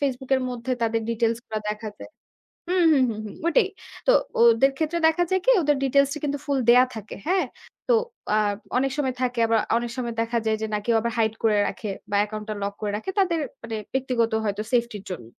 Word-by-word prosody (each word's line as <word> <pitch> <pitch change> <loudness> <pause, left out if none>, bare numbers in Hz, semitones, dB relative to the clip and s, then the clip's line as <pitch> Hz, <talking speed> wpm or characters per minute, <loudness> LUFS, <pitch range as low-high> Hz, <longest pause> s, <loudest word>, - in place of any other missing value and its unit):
Facebook 265 -1 -2
এর 260 - +1
মধ্যে 245 +1 -3
তাদের 225 0 +1
details 230 0 +1
গুলা 215 -1 -3
দেখা 215 +1 -4
যায়। - - -10 0.6
উ - - +2 0.2
হু, 285 - +4
হু, - - -3
হুম, 210 - -8
ওটাই। 400 +3 +3 0.4
তো - - +6 0.3
ওদের 235 +3 +6
ক্ষেত্রে 320 +3 -1
দেখা 320 +2 +3
যায় 375 - +2
কি - - +4
ওদের 295 -1 +2
details 275 +1 +3
টি - - -5
কিন্তু 285 0 -1
full 280 -1 +1
দেয়া 250 +2 +8
থাকে, 215 -1 -8
হ্যাঁ? 370 -2 +2 0.4
তো - - +4 0.4
আ - - +4 0.4
অনেক 270 +2 +2
সময় 265 -4 -1
থাকে 250 -1 -1
আবার 225 0 +3 0.2
অনেক 235 0 -1
সময় 240 -2 -3
দেখা 230 +1 0
যায় 220 0 +2
যে - - 0
না - - +1
কেউ 235 - +2
আবার 235 +1 -2
hide 220 -1 +1
করে 215 -2 +3
রাখে 215 - -6 0.2
বা 200 - +1
account 215 0 -6
টা 215 - -2
lock 200 0 -2
করে 205 -1 -2
রাখে 220 - -4
তাদের 345 -4 +2 0.2
মানে 225 -1 -4 0.2
ব্যক্তিগত 250 -3 0
হয়তো 205 0 -1
safety 235 -3 +1
র - - -18
জন্য। 120 -11 -6
235 Hz, 220 wpm, -24 LUFS, 220-275 Hz, 0.6 s, দেয়া